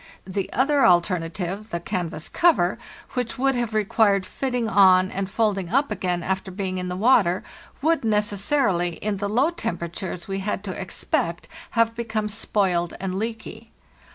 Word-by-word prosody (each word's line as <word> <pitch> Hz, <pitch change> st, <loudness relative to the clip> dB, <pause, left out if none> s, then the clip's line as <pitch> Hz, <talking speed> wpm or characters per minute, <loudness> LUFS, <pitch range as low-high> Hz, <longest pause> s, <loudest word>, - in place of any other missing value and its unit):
The 190 Hz, +1 st, -3 dB
other 275 Hz, +2 st, +2 dB
alternative—the 180 Hz, +2 st, +1 dB
canvas 175 Hz, -4 st, -4 dB
cover—which 245 Hz, -, 0 dB
would 270 Hz, +1 st, +2 dB
have 240 Hz, -3 st, -2 dB
required 210 Hz, -2 st, +3 dB
fitting 250 Hz, -1 st, -2 dB
on 190 Hz, -3 st, +5 dB
and 195 Hz, 0 st, -3 dB
folding 200 Hz, -4 st, 0 dB
up 275 Hz, +2 st, +1 dB
again 180 Hz, -4 st, -1 dB
after 190 Hz, +1 st, -2 dB
being 185 Hz, -1 st, -3 dB
in 180 Hz, 0 st, -4 dB
the 180 Hz, -, -3 dB
water, 200 Hz, -5 st, +3 dB, 0.4 s
would, 325 Hz, -1 st, +2 dB
necessarily, 210 Hz, -3 st, +1 dB
in 210 Hz, +2 st, -3 dB
the 200 Hz, +1 st, -2 dB
low 260 Hz, +10 st, +2 dB
tem 340 Hz, -, -3 dB
peratures 170 Hz, +1 st, -6 dB
we 195 Hz, 0 st, -2 dB
had 195 Hz, 0 st, -3 dB
to 200 Hz, -, -4 dB
expect, 170 Hz, -2 st, -2 dB, 0.3 s
have 230 Hz, 0 st, +4 dB
become 225 Hz, -2 st, -2 dB
spoiled 190 Hz, -5 st, 0 dB
and 190 Hz, -1 st, -3 dB
leaky. 220 Hz, +2 st, -5 dB
200 Hz, 150 wpm, -24 LUFS, 185-230 Hz, 0.4 s, on